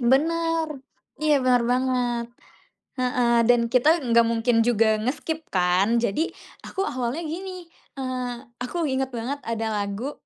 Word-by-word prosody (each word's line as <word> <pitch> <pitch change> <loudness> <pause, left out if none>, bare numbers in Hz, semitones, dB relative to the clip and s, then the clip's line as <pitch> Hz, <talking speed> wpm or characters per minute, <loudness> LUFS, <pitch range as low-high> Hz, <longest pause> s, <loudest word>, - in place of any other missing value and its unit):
Bener. 325 +6 +2 0.5
Iya 300 -2 +2
bener 250 -1 +3
banget, 250 -2 0 0.8
heeh. 250 -1 +1 0.2
Dan 245 -1 +5
kita 295 +6 +5
nggak 235 -1 +4
mungkin 230 0 +2
juga 225 -2 +3
nge-skip 310 +7 -3
kan 185 +4 +2
jadi 235 +7 0 0.3
aku 385 +1 -3
awalnya 255 +4 -2
gini, 365 +3 -6 0.3
eee, 255 -2 -4 0.2
aku 325 +7 -2
inget 265 -2 0
banget 255 +3 -4
ada 225 -1 -2
lagu 205 +6 -3
250 Hz, 130 wpm, -24 LUFS, 235-295 Hz, 0.8 s, Dan